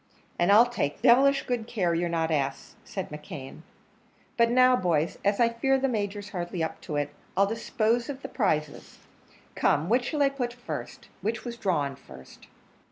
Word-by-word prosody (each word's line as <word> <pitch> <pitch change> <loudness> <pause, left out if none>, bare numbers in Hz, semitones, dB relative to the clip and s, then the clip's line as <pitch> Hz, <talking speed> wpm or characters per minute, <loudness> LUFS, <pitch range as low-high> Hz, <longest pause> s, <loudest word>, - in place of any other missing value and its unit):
"And 175 +3 +3
I'll 220 +4 +8
take 230 -9 -3
devilish 275 +3 +5
good 240 -3 -2
care 185 -8 0
you're 170 +1 0
not 165 -1 0
asked," 140 -3 -2
said 190 -2 -6
McKeon: 150 -1 -9 0.7
"but 235 -1 +4
now, 255 +1 +5
boys, 170 -6 0
as 200 0 +1
I 235 -1 +5
fear 270 +4 +1
the 270 +1 +1
Major's 205 -3 -3
hardly 175 -3 -3
up 160 - -4
to 150 - -5
it, 145 0 -1 0.3
I'll 195 - +5
dispose 225 +3 0
of 275 -1 -6
the - - -4
prizes. 155 - -2 0.6
Come, 155 +5 +1
which 245 +2 +2
shall 295 +2 0
I 275 - +4
put 250 -3 -3
up 245 - -21
first? 245 - -7
which 220 +4 -3
was 240 -1 -5
drawn 150 - -1
first?" 65 - -15
205 Hz, 180 wpm, -27 LUFS, 160-240 Hz, 0.7 s, I'll